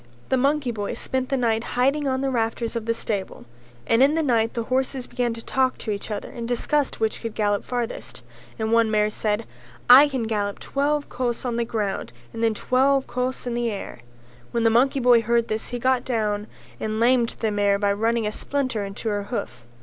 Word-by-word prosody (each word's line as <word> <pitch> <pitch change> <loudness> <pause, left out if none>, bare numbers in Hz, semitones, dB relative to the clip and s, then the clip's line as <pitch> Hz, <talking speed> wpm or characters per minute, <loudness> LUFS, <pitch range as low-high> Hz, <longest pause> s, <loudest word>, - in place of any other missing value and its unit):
The - - +3
monkey 275 0 +1
boy 205 -3 -4
spent 260 -1 -2
the 270 - +1
night 225 -2 +1
hiding 275 +3 +2
on 260 0 0
the 270 -1 0
rafters 230 -1 -1
of 230 -1 -3
the 230 - +2
stable; 200 - -4 0.4
and 230 - +3
in 280 +3 +5
the 325 - +1
night 230 -4 +1
the 230 - -1
horses 260 +1 -1
began 245 -1 -1
to 230 - -10
talk 260 -1 +1
to 220 - -4
each 200 +1 -4
other 210 -1 -5
and 235 -1 -6
discussed 275 +4 0
which 220 -1 -1
could 230 -2 -5
gallop 205 -2 +1
farthest, 245 -2 -4 0.3
and 220 0 -2
one 230 -1 +4
mare 210 0 +2
said 215 +1 -1 0.5
"I 275 +4 +10
can 265 -4 -2
gallop 205 -2 -1
twelve 290 +1 -1
kos 245 -1 -3
on 240 -2 -1
the 235 - 0
ground 205 - -3 0.2
and 230 - -4
then 225 -1 +2
twelve 265 +4 +2
kos 255 +1 -3
in 245 - -2
the 240 0 0
air." 200 - -6 0.5
When 235 - -1
the 225 - +4
monkey 265 +4 +3
boy 245 -2 +5
heard 235 +1 +1
this 215 0 -2
he 245 - -3
got 255 0 +1
down 210 -4 -1 0.3
and 215 0 -2
lamed 240 0 +3
the 220 -2 0
mare 205 -1 +2
by 200 0 +1
running 225 +2 0
a 210 - -1
splinter 255 -3 -2
into 200 +3 -6
her 205 -1 -2
hoof. 125 - -5
235 Hz, 210 wpm, -24 LUFS, 215-255 Hz, 0.5 s, I